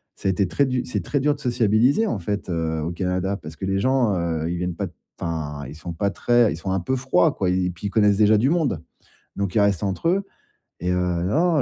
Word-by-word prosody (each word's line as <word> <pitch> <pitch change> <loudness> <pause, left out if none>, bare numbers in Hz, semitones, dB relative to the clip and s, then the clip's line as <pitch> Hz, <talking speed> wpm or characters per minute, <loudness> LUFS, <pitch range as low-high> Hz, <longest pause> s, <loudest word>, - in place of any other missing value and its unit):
Ça - - -4
a - - +4
été 95 +1 +1
très 140 - +2
du 125 -1 -1
c'est - - -3
très 145 - -1
dur 145 +2 +2
de 145 - -15
sociabiliser, 120 - +2
en 115 - -1
fait, 100 +1 -3
heu, 80 -2 -1
au 80 - -2
Canada. 90 +2 -1
Parce - - -10
que 95 - -5
les 95 0 0
gens, 125 -4 +2
heu, 85 -1 -1
ils 90 - -2
viennent 90 0 -2
pas 100 +2 -3
t 85 - -15 0.3
enfin, 75 -4 -4
ils 70 - -9
sont 85 +2 -7
pas 100 +4 0
très 120 +1 +3
ils - - -4
sont 95 +3 -4
un 95 - +1
peu 130 +10 -1
froids, 130 +4 +3
quoi 95 -2 0
et 90 0 +1
puis, 90 +3 -8
ils - - -3
connaissent 105 -2 +4
déjà 105 0 +5
du 130 +5 +3
monde. 150 - +1 0.6
Donc, 100 -2 -2
ils 110 - +4
restent 100 -3 +2
entre 95 - -1
eux 195 +2 +1 0.5
et 90 +2 -1
heu, 90 - +2
non, 95 - +1
100 Hz, 260 wpm, -23 LUFS, 85-125 Hz, 0.6 s, déjà